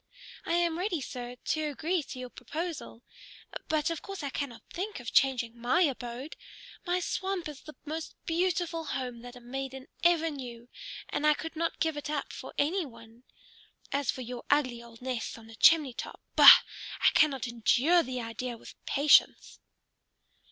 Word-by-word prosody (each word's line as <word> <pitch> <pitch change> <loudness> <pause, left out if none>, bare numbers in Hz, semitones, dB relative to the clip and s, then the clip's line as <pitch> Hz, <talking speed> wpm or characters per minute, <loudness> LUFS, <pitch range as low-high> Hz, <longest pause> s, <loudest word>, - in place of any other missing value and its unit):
I 330 - 0
am 340 -1 +1
ready, 365 -3 -1
sir, 245 -2 -6
to 310 +5 -2
agree 325 +5 -1
to 270 - -9
your 250 -1 -7
proposal. 300 -2 -6 0.6
But 310 +1 +1
of 330 - -4
course 390 -5 -7
I 280 - -3
cannot 265 -5 -5
think 400 -1 -4
of 240 -2 -7
changing 250 -3 +3
my 245 +9 +1
abode. 255 -1 -3 0.5
My 355 +1 +2
swamp 375 0 -2
is 295 -2 -9
the 305 - -12
most 315 +2 -5
beautiful 335 -1 0
home 250 -4 -4
that 245 +1 -10
a - - -10
maiden 265 +2 -6 0.2
ever 330 -2 +4
knew, 245 -4 -8 0.4
and 300 - 0
I 300 - +5
could 325 +2 -7
not 335 +1 -2
give 320 -2 0
it 295 - -5
up 300 -2 -3
for - - -8
any 345 +6 +1
one. 230 -2 -14 0.7
As 280 -1 -1
for 260 - -1
your 245 0 -6
ugly 255 -5 +2
old 235 0 -14
nest 250 -3 -3
on 225 - -13
the 225 - -13
chimney 300 -1 +5
top, - - -7 0.2
bah! - - +11 0.4
I - - +7
cannot 275 -4 +3
endure 245 +8 +3
the 255 -3 -4
idea 230 +1 -5
with - - -14
patience." 285 +1 +4
275 Hz, 175 wpm, -30 LUFS, 245-325 Hz, 0.7 s, bah